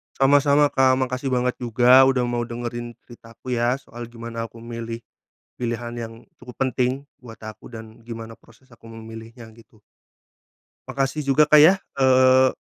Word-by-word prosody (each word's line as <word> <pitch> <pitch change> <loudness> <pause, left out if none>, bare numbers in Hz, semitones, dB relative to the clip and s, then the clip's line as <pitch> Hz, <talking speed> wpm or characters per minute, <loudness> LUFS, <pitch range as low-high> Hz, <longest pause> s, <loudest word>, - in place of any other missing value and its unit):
Sama-sama 145 +1 +3
Kak. 130 -1 +3
Makasih 130 +1 -3
banget 125 -1 -1
juga 125 +2 +4
udah 130 -2 +1
mau 120 -1 -2
dengerin 120 0 -6
cerita 115 -1 -16
aku 130 - -9
ya, 120 +1 +1
soal 120 -3 -10
gimana 115 0 -7
aku 115 0 -15
milih 115 0 -7 0.6
pilihan 120 -1 -4
yang 115 -1 -7 0.3
cukup 125 0 -12
penting 130 +1 -1 0.2
buat 115 -3 -13
aku 110 0 -10
dan 110 -1 -11
gimana 115 -1 -8
proses 125 +3 -24
aku 115 -1 -17
memilihnya 115 +1 -11
gitu. 115 -1 -21 1.1
Makasih 135 +2 -2
juga 150 +2 +3
Kak, 150 - +7
ya. 180 - +6 0.2
Eee 130 -1 +4
120 Hz, 150 wpm, -22 LUFS, 115-130 Hz, 1.1 s, Kak